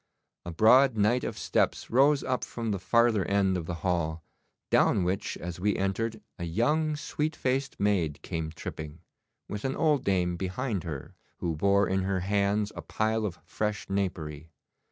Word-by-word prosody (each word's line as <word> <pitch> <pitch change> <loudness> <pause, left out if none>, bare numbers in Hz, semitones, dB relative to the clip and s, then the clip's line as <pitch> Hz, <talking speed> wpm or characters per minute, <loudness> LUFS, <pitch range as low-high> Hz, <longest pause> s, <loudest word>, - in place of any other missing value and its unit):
A - - -3
broad 115 +7 +5
night 110 +5 +3
of - - -4
steps - - 0
rose 140 +4 +4
up 130 -1 -1
from 115 -2 -3
the 100 - -1
farther 115 +1 +3
end 100 -1 +2
of 85 -3 -3
the 90 - -3
hall, 85 -3 0 0.5
down 95 - +4
which 95 +3 -2
as 90 0 -6
we 105 +3 +1
entered 105 +3 -2 0.2
a - - -4
young 150 - +1
sweet 150 +1 -2
faced 135 +2 -1
maid 95 -8 +1
came 80 -1 -3
tripping, 80 0 -7 0.5
with 105 0 -5
an 135 0 -1
old 150 -4 +2
dame 90 -3 +1
behind 95 +2 -2
her, 75 -5 -6 0.2
who 85 -2 -2
bore 100 +4 +3
in 95 0 +1
her 95 0 -1
hands 100 +2 +1
a - - -5
pile 110 0 0
of 90 -3 -7
fresh 105 -1 -3
napery. 80 -6 -3
100 Hz, 170 wpm, -28 LUFS, 90-115 Hz, 0.5 s, broad